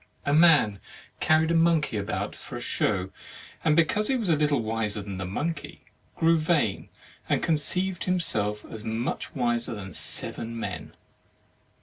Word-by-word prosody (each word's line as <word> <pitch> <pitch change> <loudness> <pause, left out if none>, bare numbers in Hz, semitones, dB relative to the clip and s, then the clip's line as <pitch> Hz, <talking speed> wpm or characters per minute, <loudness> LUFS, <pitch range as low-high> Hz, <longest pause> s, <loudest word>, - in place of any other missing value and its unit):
37 145 +3 +4
THE 175 - +9
MARRIAGE 165 -3 +7
OF 110 - 0
"A - - -6
man 100 - -15 0.4
carried 160 +1 +3
a - - +2
monkey 165 -7 +2
about 100 -1 -3
for - - -10
a - - -4
show, 95 -3 0 0.5
and 155 -2 +3
because 190 +6 +2
he 270 - +2
was 225 -7 -1
a 165 - +5
Uttle 150 -4 +1
wiser 110 -2 -1
than 100 -2 -6
the 95 - -3
monkey, 155 - -4 0.3
grew 165 0 +3
vain, 155 - 0 0.4
and - - +1
conceived 175 +4 +1
himself 105 - 0
as 110 - -9
much 115 +2 -3
wiser 120 -2 0
than 95 -3 -8
seven 115 +8 +1
men. - - -6
145 Hz, 170 wpm, -26 LUFS, 105-165 Hz, 0.5 s, THE